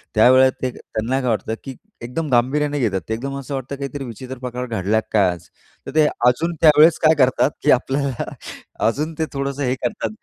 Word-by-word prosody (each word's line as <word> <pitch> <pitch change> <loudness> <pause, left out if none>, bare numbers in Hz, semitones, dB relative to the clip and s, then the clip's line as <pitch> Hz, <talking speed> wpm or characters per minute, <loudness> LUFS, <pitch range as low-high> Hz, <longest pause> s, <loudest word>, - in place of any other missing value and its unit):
त्यावेळेला 130 +4 +6
ते 130 - 0
त्यांना 120 +5 -3
काय 125 - -1
वाटतं 110 0 -1
की 135 -2 -7 0.3
एकदम 140 +6 -4
गांभीर्याने 145 +4 +1
घेतात 95 -7 0
ते, - - 0
एकदम 135 +4 -4
असं 140 +1 -7
वाटतं 135 +1 -5
काहीतरी 140 0 -5
विचित्र 130 +2 -8
प्रकार 125 0 -5
घडला 110 -2 0
की - - -10
काय 100 -4 +4
आज. 90 -1 -10 0.4
तर - - -6
ते 155 - +5 0.2
अजून 165 +8 +1
त्यावेळेस 155 +1 +6
काय 155 +1 +6
करतात 130 +2 +3
की 150 - +4
आपल्याला 135 0 0 0.5
अजून 150 +7 -1
ते 160 - +1
थोडंसं 140 0 -3
हे 130 0 0
करतात 210 - -3
130 Hz, 195 wpm, -20 LUFS, 120-145 Hz, 0.5 s, त्यावेळेला